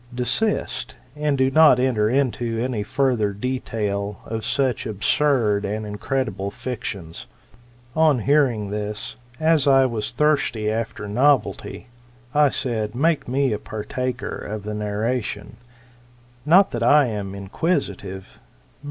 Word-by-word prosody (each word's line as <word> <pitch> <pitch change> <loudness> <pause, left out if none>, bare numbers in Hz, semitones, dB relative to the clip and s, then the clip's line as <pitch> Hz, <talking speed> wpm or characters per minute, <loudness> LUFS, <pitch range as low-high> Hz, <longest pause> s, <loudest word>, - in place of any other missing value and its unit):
Desist, 125 - -1 0.2
and 150 -1 0
do 130 0 +2
not 155 -4 +6
enter 120 -5 +2
into 120 -3 0
any 120 -2 -1
further 125 -3 0
detail 105 -3 -3
of 110 0 -4
such 130 +1 0
absurd 110 0 +1
and 105 +2 -3
incredible 105 -1 -2
fictions. 100 -7 -6 0.7
On 155 -3 +4
hearing 125 -7 +2
this, 105 +4 -4 0.2
as 160 -3 +3
I 135 -1 +6
was 115 -4 -2
thirsty 120 -6 +1
after 110 -1 -3
novelty, 130 +6 +1 0.5
I 150 -1 +5
said. 110 -5 -2
Make 155 +4 +1
me 130 -1 +1
a 105 - -3
partaker 125 +4 -4
of 105 -1 -6
your 105 - -3
narration; 105 +3 -3 0.9
not 185 +5 +6
that 120 - -3
I 145 +5 +5
am 100 -4 -4
inquisitive, 100 - -3
but. - - -30
120 Hz, 125 wpm, -22 LUFS, 105-135 Hz, 0.9 s, not